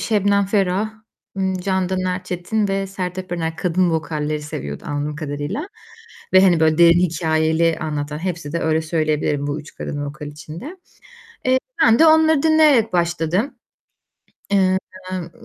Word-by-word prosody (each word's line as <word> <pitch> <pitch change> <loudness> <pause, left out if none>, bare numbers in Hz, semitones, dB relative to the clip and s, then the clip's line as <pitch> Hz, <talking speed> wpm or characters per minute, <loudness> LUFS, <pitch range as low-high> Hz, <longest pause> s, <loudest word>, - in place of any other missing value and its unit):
Şebnem 200 -2 +2
Ferah, 200 +1 0 0.5
ımm, 190 -1 0
Candan 190 0 -1
Erçetin 185 +3 -2
ve 195 0 -1
Sertap 185 -1 -5
Erener. 165 -2 -2
Kadın 180 0 +1
vokalleri 155 -1 -2
seviyordu, 70 - -6
anladığım 145 0 -3
kadarıyla 150 - -4 0.6
ve, 185 0 +7
hani, 175 -4 +4
böyle 155 0 +3
derin 170 0 +7
hikâyeli 160 -1 +1
anlatan, 150 -1 -3
hepsi 170 -4 -4
de 170 - -1
öyle 160 0 +1
söyleyebilirim 155 -3 -1
bu 145 +1 -3
3 150 - -14
kadın 145 -1 -5
vokal 150 +1 -7
için 155 +2 -10
de. 315 +9 -8 0.7
Eee, 255 0 +3 0.2
ben 230 -7 +5
de 325 - +7
onları 315 -2 +5
dinleyerek 305 -9 +4
başladım. 175 - 0 1.0
Eee, 190 -1 +3 0.4
ımm, 175 -2 -5
175 Hz, 145 wpm, -20 LUFS, 155-195 Hz, 1.0 s, ve